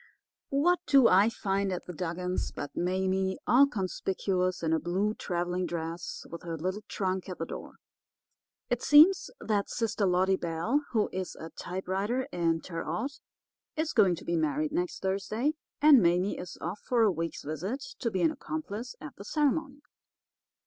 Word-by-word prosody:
"What 340 +6 +3
do 270 -4 +7
I 195 +4 +5
find 195 -3 -1
at 180 - -4
the 180 - -7
Dugans' 180 +2 -3
but 145 - -7
Mame 190 +1 0
all 275 +3 +6
conspicuous 185 -4 -1
in 160 0 +1
a 160 - +3
blue 185 +6 0
travelling 180 -2 -2
dress, 165 0 -5
with 170 - -7
her 165 -1 -5
little 185 +6 -3
trunk 190 -1 -2
at 180 - -5
the 165 - -3
door. - - -8 1.0
It 245 - +1
seems 310 +6 +6
that 205 -2 -1
sister 225 -3 0
Lottie 185 +1 +3
Bell, 170 - 0
who 220 -4 +1
is 185 -2 -4
a 160 +1 -9
typewriter 195 +7 -2
in 165 -2 +1
Terre 165 -3 -5
Haute, 225 - -3 0.6
is 315 0 -1
going 195 -6 +5
to - - -11
be 170 - 0
married 155 -1 0
next 180 +1 -2
Thursday, 215 +9 0 0.3
and 295 -5 +8
Mame 180 +3 +2
is 180 - -7
off 175 +5 -4
for 240 -2 +2
a 215 - +5
week's 165 -1 -4
visit 180 - -4 0.2
to 235 - 0
be 190 -5 -1
an 160 - +4
accomplice 255 -6 -5
at 150 - -9
the 200 - -8
ceremony. 290 +3 0
190 Hz, 170 wpm, -29 LUFS, 175-230 Hz, 1.0 s, and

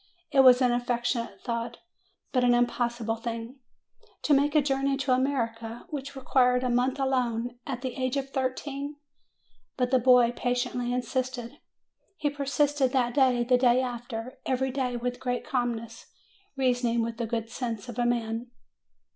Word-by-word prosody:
It 275 - +3
was 255 -1 +8
an 250 - +4
affectionate 240 0 -1
thought, 235 -1 -3 0.5
but 255 -2 +2
an 245 0 +5
im 240 0 +5
possible 235 -2 -2
thing. 230 +3 -6 0.6
To 300 - +3
make 285 +2 +3
a 305 - +6
journey 275 0 +1
to 270 -1 +1
America, 230 -3 -1
which 280 -2 -5
required 250 -1 +2
a 250 - +1
month 250 +3 +1
alone, 245 -3 -1
at 255 -2 -4
the 255 -2 -3
age 255 0 -1
of 270 0 -3
thirteen! 275 +2 -3 0.8
But 250 -1 0
the 260 - +5
boy 250 -1 +5
patiently 245 0 -1
insisted. 250 +1 -3 0.6
He 290 - 0
persisted 285 -1 +1
that 245 -2 +2
day, 255 -3 +3
the 250 +1 +3
day 250 -1 +4
after, 240 -1 -5
every 265 0 0
day, 250 -2 -1
with 245 +1 -3
great 245 -1 -2
calmness, 235 -2 -3 0.5
reasoning 245 -3 +1
with 230 0 -4
the 235 -2 -2
good 230 0 -3
sense 235 -2 -4
of 240 0 -6
a 240 - +2
man. 230 0 -1
250 Hz, 160 wpm, -28 LUFS, 240-265 Hz, 0.8 s, was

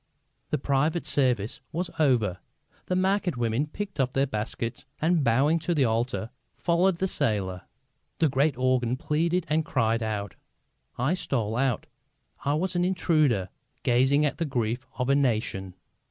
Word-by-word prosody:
The 150 - +1
private 145 +5 0
service 125 -6 +1
was 170 +1 -3
over; 115 - +2 0.5
the 180 - 0
market 190 -4 +1
women 120 +5 0
picked 195 +2 -6
up 130 -1 +1
their 135 +1 +2
baskets 115 -1 -4 0.2
and, 165 -1 +2
bowing 135 +7 +3
to 170 +2 -1
the 140 -4 +3
altar, 115 -1 -1 0.2
followed 175 +2 +2
the 190 - 0
sailor. 100 - -1 0.5
The 160 - +3
great 140 0 +1
organ 130 -1 +1
pleaded 165 +5 0
and 155 +2 +1
cried 115 -6 +1
out. 105 -3 -3 0.6
I 135 +8 +1
stole 120 - -1
out. 130 -2 0 0.6
I 145 +1 +1
was 180 +3 -1
an 175 - +2
intruder, 155 - +2 0.3
gazing 135 +4 +3
at 150 - -2
the 165 - +1
grief 120 -2 -2
of 125 - -1
a 140 - +4
nation. 110 -9 0
135 Hz, 155 wpm, -27 LUFS, 115-160 Hz, 0.6 s, a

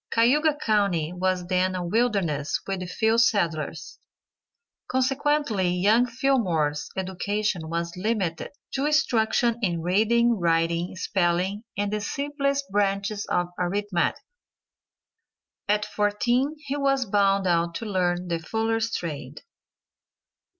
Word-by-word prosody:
Cayuga 290 +7 +3
county 200 - 0
was 185 0 -1
then 185 +1 +1
a 180 -1 -3
wilderness 195 -8 0
with 185 -2 -4
few 225 +4 +2
settlers, 170 -7 0 0.9
consequently 260 -6 +1
young 205 +7 +3
Fillmore's 185 - 0
education 190 -2 -2
was 170 +1 -3
limited 190 -4 -2 0.2
to 275 +2 0
instruction 235 -5 +2
in 170 -6 -1
reading, 225 +5 +2
writing, 170 +1 +1
spelling 185 +3 0
and 205 0 -1
the 210 - -1
simplest 280 +3 -2
branches 200 +1 0
of 175 0 0
arithmetic. 185 0 0 1.5
At 210 +1 +1
fourteen 240 +8 0
he 285 -2 -5
was 275 -2 +1
bound 195 -1 +2
out 170 -1 +1
to 230 - -4
learn 180 -3 0
the 170 -1 -1
fuller's 225 +5 -1
trade. 150 - -5
200 Hz, 110 wpm, -25 LUFS, 175-235 Hz, 1.5 s, Cayuga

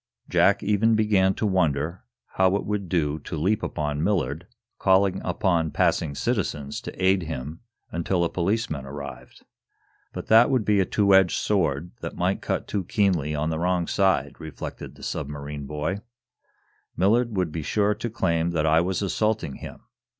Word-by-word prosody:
Jack - - +3
even 105 +2 +3
began 100 -3 +3
to - - -2
wonder 85 -3 0 0.3
how 95 0 +3
it 100 - -2
would 100 -3 -3
do 80 -4 0
to 80 - -6
leap 95 +7 +1
upon 75 -1 -2
Millard, 85 -5 -1 0.3
calling 95 0 +3
upon 85 -2 +1
passing 75 -1 +1
citizens 75 - -2
to - - -6
aid 95 0 +4
him 80 -1 -6 0.3
until 85 +2 0
a 85 - +1
policeman 90 -5 -1
arrived. 70 +1 -9 0.7
"But - - -6
that 115 +2 +6
would 130 -6 +1
be 105 -1 +3
a 95 - +3
two 100 +1 +2
edged 95 -2 +5
sword, 85 -5 0
that - - -5
might - - 0
cut - - -2
too 100 - -2
keenly 90 -7 +1
on 75 +2 -1
the 80 - -2
wrong 90 0 +1
side," 85 -8 +1
reflected 80 -2 -8
the - - -14
submarine 75 -1 -5
boy. 75 +7 -3 1.0
"Millard 110 +4 +2
would 90 -4 0
be 80 - -4
sure 105 +7 +1
to 120 - -4
claim 85 -7 0
that 80 -2 +1
I 80 +1 +4
was 95 +2 -1
assaulting 105 -5 -1
him. - - -10
90 Hz, 165 wpm, -25 LUFS, 75-100 Hz, 1.0 s, that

